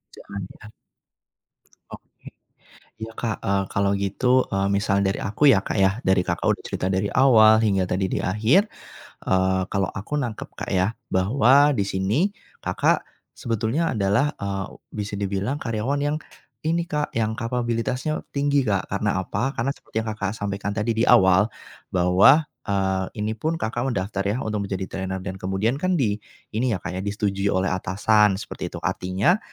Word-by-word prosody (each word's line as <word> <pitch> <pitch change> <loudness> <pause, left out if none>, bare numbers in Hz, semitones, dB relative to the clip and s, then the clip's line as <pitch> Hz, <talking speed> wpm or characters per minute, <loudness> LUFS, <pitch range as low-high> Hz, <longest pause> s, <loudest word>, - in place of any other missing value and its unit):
Jangan 100 0 -8 0.2
ya. 110 - -11 1.2
Oke. - - -13 0.7
Iya 110 0 -7
Kak, 115 -2 -3
e - - -1 0.2
kalau 100 0 +1
gitu 115 +6 +1
e 100 - -3 0.2
misal 100 0 +1
dari 95 0 0
aku 105 +9 -1
ya 95 - +4
Kak - - -4
ya, 100 +3 +2
dari 95 -4 +2
Kakak - - -1
udah - - +1
cerita 90 - -2
dari 95 +2 0
awal 110 -4 +6
hingga 100 -4 +2
tadi 95 +1 -1
di - - -2
akhir, 110 - +3 0.6
eee, 95 0 +2
kalau 95 -1 +1
aku 105 +9 -4
nangkep 120 -7 -3
Kak - - -5
ya 95 +4 +1 0.2
bahwa 130 +8 +4
di 100 - +1
sini 100 - 0 0.3
Kakak - - +1 0.3
sebetulnya 115 +8 -1
adalah 105 +7 +1
e 100 - -3 0.5
bisa 105 0 -4
dibilang 100 +8 -2
karyawan 115 +5 -1
yang 145 +1 0 0.5
ini 170 +2 0
Kak, 150 -3 -2
yang 110 -1 0
kapabilitasnya 120 +4 -2
tinggi 140 -1 +1
Kak. 100 -4 -1
Karena 100 -1 0
apa? 135 +8 -2
Karena 125 +4 0
seperti 110 - -4
yang 110 - -6
Kakak 100 -2 -3
sampaikan 100 0 -3
tadi 110 +1 -1
di 115 - +3
awal, 95 -4 +6 0.5
bahwa, 95 - +6 0.2
eee, 95 -2 0
ini 105 +1 -1
pun 160 +7 -1
Kakak 120 +3 -2
mendaftar 100 -1 -2
ya 105 +4 0
untuk 105 -2 -2
menjadi 95 -1 -3
trainer 95 0 -4
dan 95 -1 -5
kemudian 95 +7 -1
kan 185 +4 0
di 105 -5 +1 0.4
ini 120 +1 +1
ya - - -2
Kak - - -4
ya, - - -2
disetujui 100 -1 -1
oleh 95 +1 +1
atasan 100 +3 +2
seperti - - -6
itu. - - -6
Artinya, 95 - +1
105 Hz, 165 wpm, -23 LUFS, 95-120 Hz, 1.2 s, awal